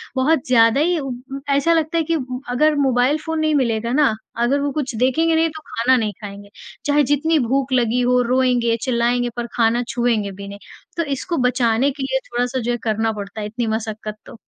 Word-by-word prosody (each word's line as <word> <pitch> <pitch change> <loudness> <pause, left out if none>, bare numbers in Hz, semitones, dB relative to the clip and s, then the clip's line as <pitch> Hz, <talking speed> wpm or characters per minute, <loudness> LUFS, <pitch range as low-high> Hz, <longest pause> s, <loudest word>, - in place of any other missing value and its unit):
बहुत 265 +2 +2
ज़्यादा 230 0 +4
ही 345 0 +1
उ 275 - -5 0.2
उँ 275 - -5
ऐसा 280 +4 +3
लगता 320 0 0
है 330 - +2
कि 330 +2 -1 0.4
अगर 300 +5 +2
मोबाइल 265 0 +2
फ़ोन 320 -1 -2
नहीं 310 -1 +1
मिलेगा 235 -3 0
ना, 290 -5 +3 0.2
अगर 240 +4 +1
वो 285 0 -1
कुछ 270 -4 -3
देखेंगे 290 +8 +2
नहीं 325 0 +2
तो 315 0 -10
खाना 245 +3 +2
नहीं 215 -3 -1
खाएँगे। 200 -1 -9 0.4
चाहे 290 0 +3
जितनी 290 +4 +2
भूख 265 +2 0
लगी 245 -1 +2
हो, 250 0 +3
रोएँगे, 245 -1 +2
चिल्लाएँगे 245 -1 +1
पर 240 -1 -4
खाना 235 0 +2
छुएँगे 235 -4 0
भी 200 +1 -9
नहीं। 200 0 -9 0.4
तो 335 - +1
इसको 340 +5 -3
बचाने 250 +2 +1
के 275 0 -6
लिए 265 0 0
थोड़ा-सा 245 +2 -1
जो 240 0 -2
है 240 - -1
करना 220 0 0
पड़ता 205 0 -7
है 210 - -3
इतनी 230 +2 -3
मशक्कत 220 -1 -4
तो। - - -12
250 Hz, 205 wpm, -20 LUFS, 230-285 Hz, 0.4 s, ज़्यादा